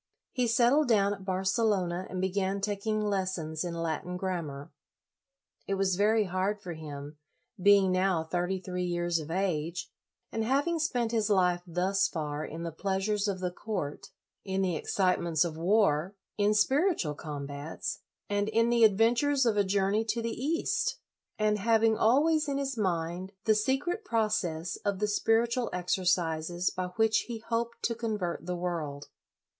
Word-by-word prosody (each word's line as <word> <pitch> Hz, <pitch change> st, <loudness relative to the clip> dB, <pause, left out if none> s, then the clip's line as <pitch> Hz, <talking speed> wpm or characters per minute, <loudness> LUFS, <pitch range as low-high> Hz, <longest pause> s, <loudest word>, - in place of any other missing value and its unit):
He 250 Hz, -2 st, 0 dB
settled 245 Hz, +6 st, +4 dB
down 205 Hz, -3 st, +3 dB
at 195 Hz, -2 st, -9 dB
Barcelona 190 Hz, -1 st, 0 dB
and 185 Hz, -, -4 dB
began 190 Hz, +1 st, 0 dB
taking 210 Hz, +2 st, -1 dB
lessons 185 Hz, -6 st, -2 dB
in 175 Hz, -1 st, -4 dB
Latin 165 Hz, +2 st, -3 dB
grammar. 165 Hz, -7 st, -4 dB, 1.0 s
It 195 Hz, -, 0 dB
was 190 Hz, -1 st, +1 dB
very 215 Hz, +3 st, +3 dB
hard 190 Hz, +2 st, -1 dB
for 180 Hz, -3 st, -6 dB
him, 150 Hz, -1 st, -8 dB, 0.4 s
being 200 Hz, -1 st, +5 dB
now 185 Hz, -2 st, +2 dB
thirty 180 Hz, +3 st, -1 dB
three 180 Hz, -1 st, -4 dB
years 175 Hz, -1 st, 0 dB
of 155 Hz, 0 st, -7 dB
age, 175 Hz, -1 st, -2 dB, 0.4 s
and 225 Hz, -, -1 dB
having 285 Hz, +8 st, +1 dB
spent 245 Hz, -8 st, 0 dB
his 220 Hz, -2 st, +1 dB
life 180 Hz, -3 st, +3 dB
thus 185 Hz, +3 st, +1 dB
far 150 Hz, -2 st, -4 dB
in 165 Hz, +2 st, -6 dB
the 170 Hz, -, -3 dB
pleasures 195 Hz, +4 st, -1 dB
of 190 Hz, -2 st, -2 dB
the 180 Hz, -1 st, -1 dB
court, 180 Hz, -7 st, -5 dB, 0.3 s
in 190 Hz, 0 st, -1 dB
the 180 Hz, -3 st, 0 dB
excite 185 Hz, +3 st, +1 dB
ments 165 Hz, -2 st, +2 dB
of 165 Hz, -2 st, -4 dB
war, 180 Hz, -1 st, +2 dB, 0.2 s
in 210 Hz, 0 st, +2 dB
spiritual 265 Hz, -, +2 dB
combats, 145 Hz, 0 st, -5 dB, 0.3 s
and 205 Hz, +1 st, 0 dB
in 230 Hz, +2 st, +2 dB
the 235 Hz, -1 st, +4 dB
adventures 235 Hz, +6 st, +4 dB
of 225 Hz, -3 st, +2 dB
a 205 Hz, -, +3 dB
journey 200 Hz, +2 st, +1 dB
to 230 Hz, +1 st, -1 dB
the 230 Hz, 0 st, -2 dB
East; 300 Hz, +8 st, -1 dB, 0.4 s
and 215 Hz, -1 st, +1 dB
having 225 Hz, +1 st, +3 dB
always 300 Hz, +8 st, +3 dB
in 280 Hz, -1 st, -1 dB
his 275 Hz, -1 st, -2 dB
mind 180 Hz, -2 st, -2 dB
the 220 Hz, -, +5 dB
secret 270 Hz, -, 0 dB
process 195 Hz, -7 st, -1 dB
of 200 Hz, -2 st, -2 dB
the 210 Hz, +2 st, 0 dB
spiritual 230 Hz, +3 st, +1 dB
exercises 175 Hz, -1 st, 0 dB
by 185 Hz, 0 st, -3 dB
which 220 Hz, -1 st, +2 dB
he 235 Hz, -2 st, -4 dB
hoped 230 Hz, +1 st, -3 dB
to 230 Hz, -, +1 dB
convert 210 Hz, -8 st, -3 dB
the 180 Hz, -, -1 dB
world. 160 Hz, -5 st, -4 dB
195 Hz, 160 wpm, -29 LUFS, 175-220 Hz, 1.0 s, being